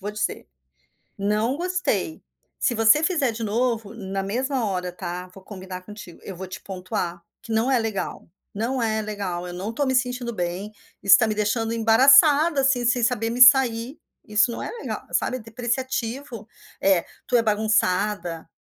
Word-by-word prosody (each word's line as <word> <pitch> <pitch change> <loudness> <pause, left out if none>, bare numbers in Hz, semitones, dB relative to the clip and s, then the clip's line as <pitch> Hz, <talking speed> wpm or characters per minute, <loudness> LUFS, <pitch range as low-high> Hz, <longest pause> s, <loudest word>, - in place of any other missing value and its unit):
vou 205 +2 -4
dizer: 210 0 -3 0.7
Não 210 +5 0
gostei". 360 -2 -2 0.4
Se 240 - +1
você 225 +7 +5
fizer 310 -8 +1
de 225 +1 -6
novo", 225 -1 -1
na 195 -3 -4
mesma 250 +5 -1
hora, 180 -3 -2
tá? 180 0 -6
Vou 190 0 -14
combinar 190 -2 -8
contigo. 205 -3 -11
"Eu 190 - -7
vou 190 +1 -7
te 185 - -8
pontuar 180 -2 -5 0.2
que 230 - -9
não 225 +4 +1
é 255 - +3
legal. 220 -6 -4 0.2
Não 240 +5 -2
é 220 -1 0
legal. 200 -5 -4
Eu 175 - -7
não 185 +4 -5
estou 255 +6 -1
me 260 - +1
sentindo 250 -1 -1
bem. 180 +2 -4 0.3
Isso 195 -1 +7
está 220 - +2
me 215 - -1
deixando 225 +2 0
embaraçada, 275 +7 +5
assim, 265 -2 +2
sem 245 +1 +2
saber 225 -2 +1
me 245 +2 -2
sair". 250 0 +5 0.3
Isso 215 +3 +2
não - - -5
é - - -4
legal, 465 - -6
sabe? 255 - 0
É - - -9
depreciativo. 240 +1 -4 0.4
“É, 190 -3 +3 0.2
tu 245 - +3
é - - +4
bagunçada”. 205 -5 0
225 Hz, 175 wpm, -23 LUFS, 195-250 Hz, 0.7 s, Isso